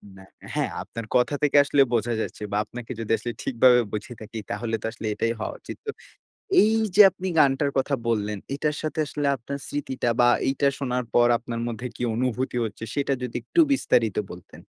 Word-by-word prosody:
না, 95 - -13 0.3
হ্যাঁ, - - 0
আপনার 115 -1 -7
কথা 125 +4 +3
থেকে 145 0 +4
আসলে 140 0 +3
বোঝা 120 +1 +1
যাচ্ছে 105 - -5
বা 105 - 0
আপনাকে 120 +2 -9
যদি 115 - -4
আসলে 120 - -4
ঠিকভাবে 125 0 +5
বুঝে 110 +3 -4
থাকি 110 +1 -7
তাহলে 115 +2 -2
তো - - -6
আসলে 110 -1 -6
এটাই 115 +2 0
হওয়া - - -3
উচিত। - - -9
তো 430 - -2 0.7
এইযে 215 -2 +4
আপনি 185 +2 -6
গানটার 140 0 +3
কথা 135 +1 +1
বললেন 105 -2 0 0.2
এটার 150 +1 -1
সাথে 155 0 -3
আসলে 145 0 -2
আপনার 140 +4 -6
স্মৃতিটা 130 -4 -2
বা 120 - +6 0.2
এইটা 140 +1 +2
শোনার 125 -2 -1
পর 120 0 +5
আপনার 115 0 -6
মধ্যে 120 +2 -4
কী - - -5
অনুভূতি 125 +1 -1
হচ্ছে 110 +1 -7
সেটা 140 -1 +1
যদি 125 -1 -5
একটু 335 - +3
বিস্তারিত 115 - +2
বলতেন? 90 -3 -12
125 Hz, 190 wpm, -25 LUFS, 115-140 Hz, 0.7 s, বা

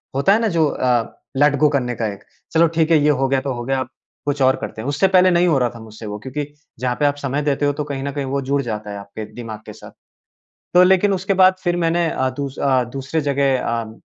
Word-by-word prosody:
होता 140 +9 +4
है 220 - +3
ना 230 - +1
जो 165 -3 +2
अ, 125 -4 0 0.2
लेट 145 0 +4
गो 150 - +5
करने 125 -4 -1
का 110 0 -2
एक। 100 - -14 0.3
चलो 165 +1 +5
ठीक 160 0 +2
है 165 - +6
ये 150 - +4
हो 135 -2 +2
गया 135 -1 +1
तो 135 -1 -3
हो 120 - -5
गया 135 0 0
अब 130 - -4 0.4
कुछ 145 -1 -1
और 130 0 +4
करते 110 - -6
हैं। 125 - -6
उससे 150 +7 +2
पहले 185 -1 +5
नहीं 175 +1 +3
हो 155 -5 +3
रहा 125 - +1
था 115 - -9
मुझसे 110 0 -11
वो 105 0 -5
क्योंकि 135 +5 -5 0.3
जहाँ 125 -1 -1
पे 145 - +2
आप 145 0 +2
समय 140 0 -2
देते 145 0 0
हो 145 - +2
तो 150 +1 -3
कहीं 140 -2 -4
न 140 - -3
कहीं 140 0 -3
वो 140 +1 -2
जुड़ 140 0 +2
जाता 105 -3 -5
है 100 - -6
आपके 100 +2 -8
दिमाग 115 -3 -7
के - - -8
साथ। - - -13 0.8
तो 180 - +8
लेकिन 190 +2 +4
उसके 190 +1 0
बाद 185 0 +6
फ़िर 175 0 +1
मैंने 170 0 +1
अ, 130 0 -1
दूस 140 -1 -4
अ, 130 -2 +2
दूसरे 140 +4 -2
जगह 140 -2 +1
अ, 115 -1 -3
140 Hz, 270 wpm, -20 LUFS, 125-160 Hz, 0.8 s, तो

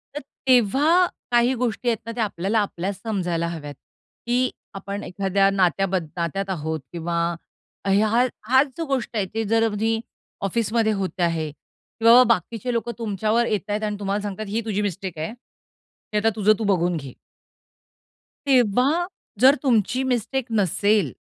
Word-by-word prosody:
तर 295 - -4 0.3
तेव्हा 270 - +4 0.3
काही 240 +1 +4
गोष्टी 245 -1 -2
आहेत 230 - +1
ना, 230 - -4
ते 230 0 -3
आपल्याला 205 +1 0
आपल्याच 195 -1 -2
समजायला 180 -6 -1
हव्यात. 155 -4 -6 0.5
की 250 +1 +2 0.3
आपण 200 +1 -5
एखाद्या 195 +1 +1
नात्याब 195 0 +1 0.2
नात्यात 190 +3 -2
आहोत 160 -3 -2
किंवा 170 0 -3 0.7
हा 215 +5 +3 0.2
हाच 260 +4 +5
जो 330 - -2
गोष्ट 270 -5 -2
आहे, 205 -3 +1
ते 225 0 -1
जर 225 +2 +3
तुम्ही 225 +1 0 0.5
ऑफिसमध्ये 225 +2 +1
होत 190 -1 -4
आहे 165 -2 0
किंवा 230 - +3
बाकीचे 230 +1 0
लोकं 235 0 -1
तुमच्यावर 220 +1 0
येतायत 210 0 -2
आणि 210 -1 -1
तुम्हाला 200 0 -1
सांगतायत, 205 +1 -5
ही 225 +3 -1
तुझी 210 -2 -1
मिस्टेक 190 -3 -4
आहे. 160 +8 -4
की 235 -2 -11
आता 215 +2 +3
तुझं 215 0 +4
तू - - -2
बघून 180 -4 +1
घे. 135 -4 -8 1.3
तेव्हा 260 - +3 0.3
जर 265 +3 +7
तुमची 250 0 +2
मिस्टेक 255 0 -1
नसेल 205 - +2
215 Hz, 145 wpm, -23 LUFS, 195-235 Hz, 1.3 s, जर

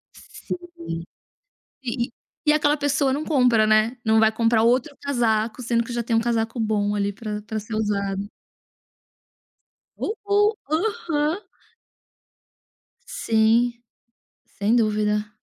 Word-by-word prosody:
Sim. - - -7 1.3
E 240 -1 -2
e - - -26 0.3
e 300 - +6
aquela 295 -1 +3
pessoa 285 -2 +1
não 290 +3 -1
compra, 250 -7 +3
né, 215 +3 +3
não 220 0 +4
vai 220 - +5
comprar 225 0 +2
outro 250 +5 +2
casaco, 235 -3 0
sendo 235 0 +1
que 235 - -10
já 240 - -1
tem 230 0 -2
um 225 - +4
casaco 230 0 -1
bom, 210 -2 0
ali, 200 0 0
para 210 0 -5
para 215 +1 -4
ser 215 +1 -6
usado. 200 -2 -1 1.7
Uh - - -1 0.2
uh, 415 +2 +4 0.2
Aham. 325 -3 0 1.7
Sim. 235 - +2 0.6
Sem 210 +3 0
dúvida. 210 -1 +1
230 Hz, 125 wpm, -23 LUFS, 215-270 Hz, 1.7 s, e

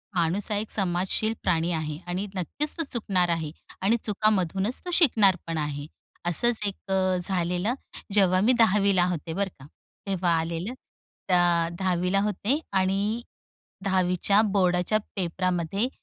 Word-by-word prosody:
माणूस 180 +5 +1
हा 205 - +1
एक 215 +1 -4
समाजशील 190 +3 +1
प्राणी 165 +1 +1
आहे 155 -2 -3
आणि 185 +3 -2
नक्कीच 285 - -1
तो 330 - -1
चुकणार 190 -7 +1
आहे. 160 -3 -1 0.3
आणि 220 +5 +3
चुकामधूनच 205 0 +1
तो 355 - -4
शिकणार 215 - +4
पण 165 -1 -3
आहे. 145 -1 -3 0.4
असंच 220 +7 +4
एक 195 -1 -7 0.3
झालेलं. 180 +4 0 0.4
जेव्हा 185 -3 +4
मी 245 +5 +4
दहावीला 200 -4 +4
होते 165 -1 -4
बरं 195 +1 -1
का. 135 - -12 0.4
तेव्हा 180 -3 0
आलेलं. 170 +8 -3 0.5
त्या 175 -2 +3
दहावीला 185 +1 +1
होते 210 - 0
आणि 195 +4 0 0.6
दहावीच्या 190 +2 +2
बोर्डाच्या 190 -1 +1 0.2
पेपरामध्ये 185 +3 -1
190 Hz, 130 wpm, -26 LUFS, 175-210 Hz, 0.6 s, शिकणार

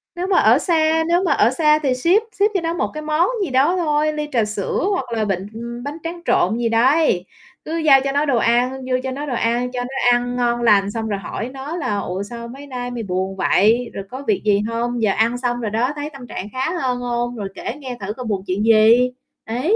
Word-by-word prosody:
Nếu 360 +2 -3
mà 385 - +2
ở - - +5
xa 320 -2 +2
nếu 350 +2 +2
mà 345 - +1
ở 220 - +4
xa 300 +2 +3
thì 270 -4 +1
ship, 345 - +2
ship 400 - +3
cho 380 - 0
nó 330 0 -1
một - - -2
cái 305 - -5
món 310 +3 +1 0.2
gì 335 - -3
đó 275 +8 +3
thôi, 305 -2 +1
ly 300 0 -3
trà 230 -4 +2
sữa 210 - -2
hoặc 365 -10 -1
là 220 -1 0
bịch, 195 -3 -1
ừm, 235 +1 -7
bánh 290 +3 -5
tráng 340 +1 -5
trộn 220 +6 +2
gì 235 -1 0
đấy, 240 - +3 0.4
cứ 325 +2 -3
giao 285 -4 +5
cho 275 - -1
nó 285 +2 +1
đồ 265 -4 +1
ăn, 240 +3 +2 0.2
vô 255 - +2
cho 265 - -3
nó 285 +3 -4
đồ 265 - -3
ăn, 240 +2 0
cho 250 - -4
nó 245 0 0
ăn 245 0 0
ngon 240 -1 0
lành, 205 -3 +4
xong 225 0 -3
rồi 200 -2 -2
hỏi 230 +5 -5
nó 275 +5 -6
là 210 -10 -2
"Ủa, 190 0 -3
sao 235 +2 -8
mấy 275 +4 -10
nay 245 -2 -5
mày 240 -2 -4
buồn 190 0 -2
vậy? 225 +5 +2
Rồi 195 - -5
có 265 +2 -6
việc 405 - +1
gì 205 -1 +3
hông? 235 +1 -2
Giờ 210 -3 +3
ăn 230 +3 +1
xong 245 -1 -2
rồi 215 -2 -3
đó, 245 +5 0
thấy 295 +1 -4
tâm 255 -3 -10
trạng 205 - -6
khá 265 +5 -1
hơn 250 -1 0
hông? 240 0 -2
Rồi 205 -3 -4
kể 240 - -5
nghe 255 -3 -6
thử 200 +1 -4
coi 250 +1 -7
buồn 200 -3 -2
chuyện 190 +3 -1
gì?" 225 +3 +5 0.4
Ấy. 255 - 0
245 Hz, 255 wpm, -20 LUFS, 225-295 Hz, 0.4 s, ở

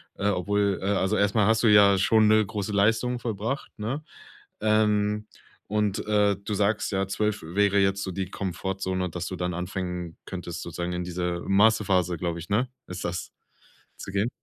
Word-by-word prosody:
Äh, 100 - -1
obwohl, 100 +1 0
äh, - - -4
also 100 +1 +1
erst 100 +1 +1
mal 105 -3 +4
hast 110 +1 +3
du - - +5
ja 100 -2 +7
schon 110 +3 +4
'ne 110 0 +5
große 105 0 -4
Leistung 115 +5 +2
vollbracht, 115 +3 -3
ne? 120 +8 -3 0.6
Ähm, 105 -1 +2 0.4
und, 105 -1 -1
äh, 105 -2 +3
du 100 +2 -5
sagst 105 +3 0
ja, 95 -1 0
12 105 +1 -1
wäre 100 +4 +2
jetzt 100 0 +1
so 95 - -4
die 95 0 -4
Komfortzone, 95 0 -3
dass 85 +1 -5
du 95 - -4
dann 90 0 -2
anfangen 90 -1 -4
könntest, 90 -2 -6
sozusagen 85 +1 -4
in 90 0 -2
diese 90 0 -3
Massephase, 95 -4 +3
glaube 85 0 -3
ich, 85 - -10
ne, 115 +5 +1 0.2
ist 90 +1 -6
das, 85 -2 -4 0.7
zu - - -7
gehen? 100 +4 0
100 Hz, 180 wpm, -26 LUFS, 90-105 Hz, 0.7 s, ja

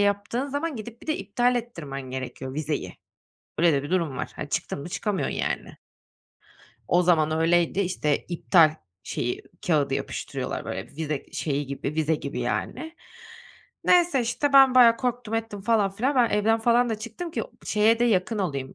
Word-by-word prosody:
yaptığın 205 +7 0
zaman 285 0 -3
gidip 230 +2 -9
bir - - -13
de 310 - 0
iptal 245 0 +1
ettirmen 165 - -5
gerekiyor 130 0 -6
vizeyi. 155 0 -3 0.6
Öyle 170 0 +5
de 140 -1 +1
bir 145 - -7
durum 165 -7 0
var. - - -4
Hani, - - -5
çıktın - - -3
mı 150 - -7
çıkamıyorsun, 200 +1 -2
yani. - - -3 1.1
O 180 +1 +4
zaman 160 -3 +3
öyleydi, 170 +3 +2
işte, 175 -6 0
iptal 165 -2 +4 0.3
şeyi, 120 - -3 0.2
kağıdı 145 -5 +2
yapıştırıyorlar, - - -4
böyle, - - -5
vize 150 -1 -4
şeyi 145 -2 -2
gibi, 140 +2 -4
vize 160 0 +1
gibi, 140 -4 -4
yani. 260 - -3 0.9
Neyse, 350 -7 +4
işte, 240 +5 -1
ben 270 -2 +7
bayağı 235 -2 +7
korktum 245 -3 -2
ettim 225 -3 -3
falan 210 -3 +2
filan. 255 +8 -1
Ben 240 -2 +4
evden 220 +2 +2
falan 240 +1 +3
da 215 - -2
çıktım 230 +10 -6
ki - - -2 0.2
şeye 220 +2 +3
de 240 - +3
yakın 215 0 +1
olayım, 140 -8 -3
200 Hz, 165 wpm, -25 LUFS, 155-240 Hz, 1.1 s, ben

